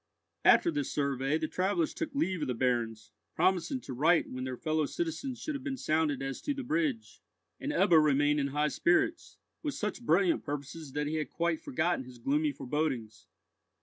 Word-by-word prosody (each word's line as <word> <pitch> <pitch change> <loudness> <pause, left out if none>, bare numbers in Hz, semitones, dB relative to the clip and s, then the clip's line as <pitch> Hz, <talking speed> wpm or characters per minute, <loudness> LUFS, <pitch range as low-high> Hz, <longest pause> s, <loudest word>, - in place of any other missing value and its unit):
After 340 - +6
this 295 -2 -2
survey, 140 0 0
the 160 -1 -2
travellers 200 - 0
took 315 -4 -4
leave 190 - 0
of 150 - -1
the 125 - -1
barons, 115 -3 -1 0.2
promising 185 +7 +1
to 130 - -7
write 160 +7 +3
when 130 0 -5
their 130 -1 -4
fellow 155 0 0
citizens 170 - -3
should 310 - -3
have 280 -2 -5
been 270 -2 -3
sounded 155 - 0
as 135 0 -4
to 290 - -2
the 275 - -4
bridge; 290 -5 -1 0.4
and 290 - -3
Ebbo 175 - +5
remained 145 0 +3
in 140 - +1
high 150 +2 0
spirits, 175 - +1 0.2
with 295 -4 -3
such 210 +3 -3
brilliant 180 -4 +2
purposes 145 0 -6
that 150 0 -1
he 155 +2 -1
had 155 - -2
quite 170 -1 -1
forgotten 160 0 -1
his 125 -1 -12
gloomy 145 +5 +1
forebodings. 130 -6 -3
155 Hz, 185 wpm, -31 LUFS, 140-205 Hz, 0.4 s, After